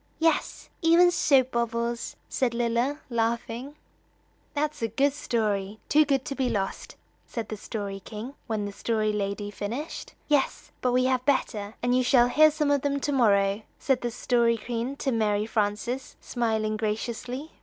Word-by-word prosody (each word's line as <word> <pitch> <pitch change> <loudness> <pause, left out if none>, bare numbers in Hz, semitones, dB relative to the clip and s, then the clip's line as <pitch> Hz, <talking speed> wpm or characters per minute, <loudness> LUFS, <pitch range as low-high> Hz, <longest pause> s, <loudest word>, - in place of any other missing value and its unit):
"Yes, 325 0 0
even 340 +2 +6
soap 265 -6 +3
bubbles," 235 0 -2
said 245 -3 0
Lilla, 240 +5 0
laughing. 235 +4 -2 0.8
"That's 300 -1 -1
a 230 - +1
good 270 +6 +1
story 210 -6 -1
too 305 +1 +5
good 275 -2 +1
to - - -3
be 265 -2 0
lost," 195 -2 -3 0.3
said 230 -3 -5
the 215 - -3
Story 200 -2 -5
King, 220 +6 -7
when 215 -3 -1
the 200 - -4
Story 215 +1 0
Lady 205 0 -2
finished. 235 +10 -5
"Yes, 290 -3 0
but 250 - +2
we 255 +1 +3
have 255 -1 +1
better, 215 -6 0
and 245 0 +3
you 255 - +4
shall 245 -1 +4
hear 310 +4 +6
some 300 -1 0
of 285 -2 +3
them 280 0 0
to 290 - -1
morrow," 200 -5 +3 0.2
said 265 -2 +1
the 240 - -1
Story 235 0 +2
Queen 240 +4 -3
to 275 -1 -1
Mary 210 -2 +1
Frances, 220 +4 -2
smiling 220 -3 -1
graciously. 235 +6 -3
235 Hz, 165 wpm, -27 LUFS, 215-270 Hz, 0.8 s, even